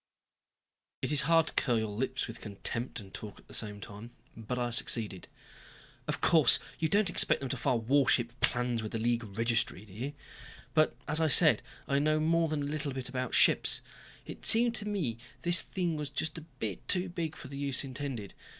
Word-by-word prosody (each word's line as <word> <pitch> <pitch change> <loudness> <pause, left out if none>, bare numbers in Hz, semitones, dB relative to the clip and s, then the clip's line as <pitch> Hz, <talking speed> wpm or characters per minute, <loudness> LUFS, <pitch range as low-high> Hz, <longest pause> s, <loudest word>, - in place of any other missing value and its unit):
It - - -1
is 145 -2 +4
hard 165 -1 +5
to - - -4
curl 120 -3 +2
your 110 0 -1
lips 130 +5 -2
with 115 - -9
contempt 115 +4 -4
and 100 -3 -12
talk 105 -2 -9
at - - -20
the - - -12
same 105 -2 -1
time, 105 +3 -10 0.3
but 115 +2 -5
I 120 -1 -2
succeeded. 110 -4 -1 0.8
"Of - - -3
course. 155 -6 +6 0.2
You 160 - +1
don't 200 +1 +2
expect - - +5
them 135 - -4
to 135 - -3
file 125 0 0
warship 120 -1 +2
plans 120 -1 0
with 110 - -7
the - - -1
League 120 +1 0
Registry, 115 -4 0
do 100 - -16
you? 130 +8 -5 0.6
But, 155 -1 +2
as 155 +2 +1
I 160 - +3
said, 140 - +6 0.3
I 140 - +1
know 155 +1 +1
more 165 +1 +1
than 150 -2 -2
a - - -3
little 150 -1 -4
bit 130 -1 -6
about 125 -2 -3
ships. - - +4 0.4
It - - -10
seemed 235 +1 +6
to 210 - -3
me 160 - -2 0.2
this 175 0 +7
thing 175 -4 -3
was 150 -2 -4
just 155 +3 -3 0.5
too 185 0 +1
big 170 -3 -4
for - - -10
the 140 - -9
use 140 -1 0
intended. 130 -6 -6
135 Hz, 195 wpm, -30 LUFS, 115-155 Hz, 0.8 s, this